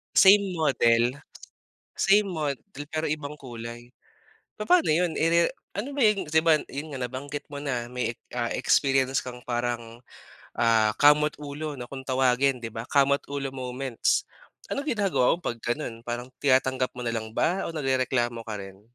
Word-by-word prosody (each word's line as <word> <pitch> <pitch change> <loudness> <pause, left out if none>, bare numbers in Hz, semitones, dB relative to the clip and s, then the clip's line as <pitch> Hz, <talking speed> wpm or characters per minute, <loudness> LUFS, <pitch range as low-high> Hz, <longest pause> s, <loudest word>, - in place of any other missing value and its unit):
Same 195 -2 +6
model 125 -4 +2 0.8
same 205 +1 +4
model 155 -1 -4
pero 155 0 -1
ibang 150 0 -3
kulay? 120 -1 -9 0.7
Papaano 330 - +3
yun, 170 +1 +2
eh, - - 0
irere 170 0 +4 0.3
ano 275 +6 -4
ba 280 - 0
yun 210 -5 +3
di 160 +1 +3
ba 160 -2 +5
yun 145 +3 -6
nga, 135 - -5
nabanggit 135 +4 -5
mo 145 0 -7
na 125 -4 -2
may, 125 -2 -2 0.2
ah, 120 -1 -1
experience 135 -1 +2
kang 125 -1 -8
parang, 120 -1 -3 0.5
ah, 110 -2 +3
kamot-ulo 150 0 +2
na 125 - -6
kung 135 +2 -8
tawagin 130 +1 +3
di 115 -2 -7
ba, 115 +1 -6
kamot-ulo 140 -1 +1
moments. 130 -1 -1 0.5
Ano - - -1
ginagawa 200 - +2
mo 175 - -18
pag 120 -1 -3
ganun, 120 -1 -3
parang 120 +2 -5
tinatanggap 130 -2 +2
mo 125 - -5
na 115 - -1
lang 110 -1 -4
ba 180 +4 +1
o - - -4
nagrereklamo 130 -4 0
ka 105 - -3
rin? 95 0 -10
135 Hz, 160 wpm, -26 LUFS, 120-155 Hz, 0.8 s, Same